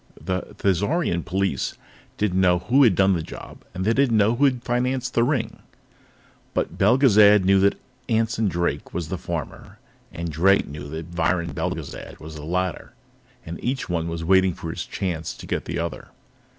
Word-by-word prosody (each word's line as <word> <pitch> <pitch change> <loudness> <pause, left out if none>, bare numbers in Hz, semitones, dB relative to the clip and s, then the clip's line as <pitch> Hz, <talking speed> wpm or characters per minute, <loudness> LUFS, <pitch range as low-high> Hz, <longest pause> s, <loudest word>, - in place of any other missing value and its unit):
The 95 0 -4
Thizarian 100 - 0
police 95 -7 -1 0.4
didn't 95 -3 +1
know 90 -1 +4
who 120 +11 +2
had 115 -9 +5
done 95 +1 +4
the 85 - -1
job, - - -10
and 95 +1 -4
they 115 - +3
didn't 130 -3 +3
know 105 +3 +3
who 140 +4 +3
had 125 -3 +1
financed 125 +1 -1
the 115 - +3
ring. 130 -2 -1 1.0
But - - -1
Belgezad 105 -7 +5
knew 95 0 +5
that 100 +1 +2 0.3
Anson 115 -1 +1
Drake 85 -2 -2
was 85 -3 -3
the 95 - -3
former, 85 -5 -6 0.3
and 85 -1 -5
Drake 95 +6 +3
knew 75 0 -8
that 80 +2 -7
Viron 85 0 0
Belgezad - - -5
was 80 0 -9
the 75 -1 -9
latter. 90 +1 -2 0.5
And 85 +1 -7
each 130 -2 -2
one 85 -1 -1
was 85 0 -4
waiting 95 0 +3
his 80 -1 -6
chance 85 -5 -3
to - - -11
get - - -3
the - - -4
other. 85 0 -4
95 Hz, 175 wpm, -23 LUFS, 85-115 Hz, 1.0 s, had